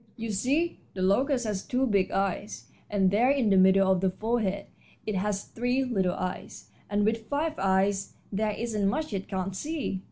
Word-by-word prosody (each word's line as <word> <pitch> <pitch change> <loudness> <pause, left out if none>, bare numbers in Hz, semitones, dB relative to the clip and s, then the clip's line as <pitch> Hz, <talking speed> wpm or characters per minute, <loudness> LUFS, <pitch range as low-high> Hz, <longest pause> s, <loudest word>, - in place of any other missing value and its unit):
"You 225 -1 -4
see, 280 - 0 0.2
the 185 - -2
locust 250 +6 +2
has 205 -3 -2
two 260 +1 0
big 200 -6 +2
eyes, 195 +1 -2 0.2
and 195 -2 +2
there 230 +6 +3
in 265 -7 +2
the - - +5
middle 190 0 +5
of 185 -1 +2
the 190 - +3
forehead 215 0 -1 0.4
it 215 - -2
has 200 +1 -1
three 245 +3 -1
little 195 -8 0
eyes, 185 0 -6 0.2
and 205 0 +1
with 220 0 -1
five 305 +2 0
eyes 195 +1 +1 0.2
there 210 +1 0
isn't 215 -3 -1
much 305 +2 -2
it 195 -1 -3
can't 190 -1 -3
see. 290 -6 -3
205 Hz, 185 wpm, -28 LUFS, 195-245 Hz, 0.4 s, the